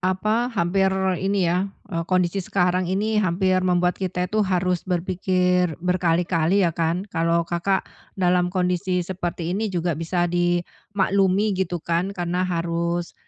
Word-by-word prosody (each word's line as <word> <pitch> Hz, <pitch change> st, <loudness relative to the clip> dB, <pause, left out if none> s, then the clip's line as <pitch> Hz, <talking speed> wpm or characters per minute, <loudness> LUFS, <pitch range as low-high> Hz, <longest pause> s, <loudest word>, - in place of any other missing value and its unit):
apa, 215 Hz, +6 st, +1 dB
hampir 190 Hz, 0 st, +2 dB, 0.3 s
ini 195 Hz, -2 st, +1 dB
ya, 185 Hz, +3 st, 0 dB, 0.2 s
e 165 Hz, -4 st, -2 dB
kondisi 185 Hz, +1 st, +1 dB
sekarang 180 Hz, 0 st, +1 dB
ini 215 Hz, +3 st, 0 dB
hampir 185 Hz, +1 st, +1 dB
membuat 180 Hz, -1 st, +2 dB
kita 180 Hz, -1 st, -2 dB
itu 215 Hz, 0 st, +1 dB
harus 180 Hz, -2 st, 0 dB
berpikir 180 Hz, -1 st, 0 dB
berkali-kali 175 Hz, 0 st, +1 dB
ya 165 Hz, -, -1 dB
kan, 170 Hz, +4 st, -1 dB
kalau 165 Hz, -1 st, +1 dB
Kakak, 190 Hz, +3 st, 0 dB, 0.3 s
dalam 180 Hz, -1 st, +2 dB
kondisi 180 Hz, 0 st, 0 dB
seperti 175 Hz, -1 st, -3 dB
ini 215 Hz, +1 st, -1 dB
juga 175 Hz, -2 st, -1 dB
bisa 175 Hz, +2 st, 0 dB
dimaklumi, 190 Hz, +3 st, 0 dB
gitu 180 Hz, -2 st, -1 dB
kan. 170 Hz, +4 st, -1 dB
Karena 180 Hz, -1 st, -2 dB
harus 170 Hz, 0 st, -2 dB
180 Hz, 135 wpm, -23 LUFS, 175-190 Hz, 0.3 s, hampir